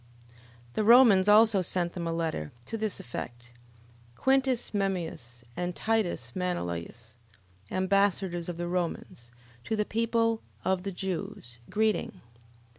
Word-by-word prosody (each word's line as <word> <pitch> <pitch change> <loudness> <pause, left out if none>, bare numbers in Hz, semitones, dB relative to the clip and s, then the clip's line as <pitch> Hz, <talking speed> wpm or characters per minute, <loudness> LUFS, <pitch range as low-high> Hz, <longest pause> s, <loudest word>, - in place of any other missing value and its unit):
11:34. - - -25 0.4
The 215 - 0
Romans 225 -4 +7
also 210 -1 +6
sent 175 -1 0
them 170 -2 -4
a - - -1
letter, 160 - -2
to 225 - -5
this 215 -3 -2
effect: 120 0 -7 0.6
Quintus 265 - +1
Memmius, 170 - -2
and 180 0 -3
Titus 195 - -1
Manilius, 115 - -4 0.5
ambassadors 190 -2 +1
of 175 - -5
the 175 0 -3
Romans, 175 -9 -3 0.3
to 220 - -2
the 210 -1 0
people 230 0 +1 0.2
of 190 -1 +1
the 195 +1 -4
Jews, 190 - -5
greeting. 215 0 0
185 Hz, 125 wpm, -29 LUFS, 165-215 Hz, 0.6 s, Romans